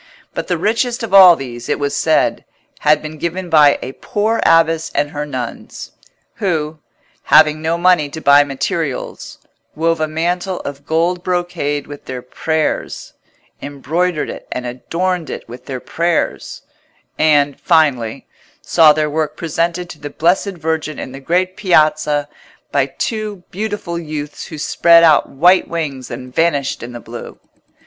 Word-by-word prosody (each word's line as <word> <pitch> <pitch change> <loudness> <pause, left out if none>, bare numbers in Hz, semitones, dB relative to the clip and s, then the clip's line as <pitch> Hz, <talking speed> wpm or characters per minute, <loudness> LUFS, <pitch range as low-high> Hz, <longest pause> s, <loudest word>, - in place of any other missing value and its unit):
But - - -4
the 175 - 0
richest 230 +6 0
of 220 - -5
all 185 -3 +9
these, 120 -4 -8
it - - +1
was 145 0 -2
said, 155 +2 +1 0.4
had 150 +1 +3
been 155 0 -8
given 175 +2 -4
by 150 -3 +6
a - - -5
poor 215 +10 -1
abbess 165 0 +3
and 145 - 0
her 150 -1 -4
nuns, 130 -4 -6 0.5
who, 155 -5 -2 0.5
having 155 0 +5
no 165 +1 0
money 175 -4 +3
to 160 - -7
buy 145 -1 +6
materials, 140 0 -4 0.4
wove 165 +1 0
a 155 - +1
mantle 175 +4 -2
of 140 +1 -8
gold 170 +3 0
brocade 175 -6 -2
with 145 -1 -11
their 125 -1 -6
prayers, 155 +4 -3 0.5
embroidered 155 +4 -2
it - - -10
and 125 - -4
adorned 165 +8 -3
it - - -7
with 120 +2 -11
their 130 -2 -4
prayers, 170 +5 -2 0.6
and, 145 -3 +3
finally, 130 -8 +1 0.3
saw 160 -3 +5
their 155 0 0
work 155 0 -2
presented 170 +2 -2
to 150 - -12
the 145 - -6
Blessed 180 +5 0
Virgin 155 -2 -2
in - - -6
the 135 - -9
great 180 +6 0
Piazza 155 -5 +2 0.4
by - - +2
two 215 -4 -4
beautiful 205 -4 -4
youths 150 -2 -6
who 155 - -8
spread 170 +2 +4
out 160 -2 +5
white 175 +7 +4
wings 145 -6 -4
and 125 +1 -8
vanished 145 -4 0
in 120 - -7
the 120 - -7
blue. 115 +1 -10
155 Hz, 155 wpm, -17 LUFS, 145-175 Hz, 0.6 s, all